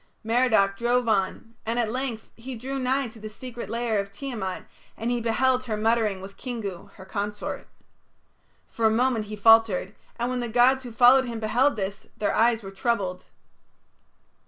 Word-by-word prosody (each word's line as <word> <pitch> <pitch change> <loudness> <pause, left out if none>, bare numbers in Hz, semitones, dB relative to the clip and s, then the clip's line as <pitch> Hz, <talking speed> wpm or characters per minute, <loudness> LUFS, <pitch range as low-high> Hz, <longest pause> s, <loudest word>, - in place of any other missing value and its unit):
Merodach 220 -4 +3
drove 240 +1 +1
on, 220 +2 0
and 230 +2 -2
at 230 -3 +1
length 250 -3 -4
he 250 +2 -7
drew 265 +4 -4
nigh 260 +1 0
to 220 - -14
the 215 0 -7
secret 240 +2 -8
lair 230 -2 0
of 200 0 -4
Tiamat, 205 -5 -5 0.3
and 230 +2 -2
he 240 -1 0
beheld 255 +3 +1
her 220 -3 -2
muttering 215 -3 +1
with 195 +1 -10
Kingu, 215 -8 -6
her 190 - -12
consort. 205 +1 -4 1.0
For 225 -1 +1
a - - +4
moment 230 0 +1
he 215 +1 -6
faltered, 215 -2 +4 0.2
and 240 +1 -1
when 255 - -1
the 240 -1 -3
gods 255 +3 +4
who 245 - -7
followed 250 +3 +6
him 235 -2 -5
beheld 245 +6 +2
this, 200 -1 -5
their 210 - 0
eyes 230 -1 +3
were 195 - -7
troubled. 195 -4 -1
230 Hz, 175 wpm, -26 LUFS, 210-245 Hz, 1.0 s, followed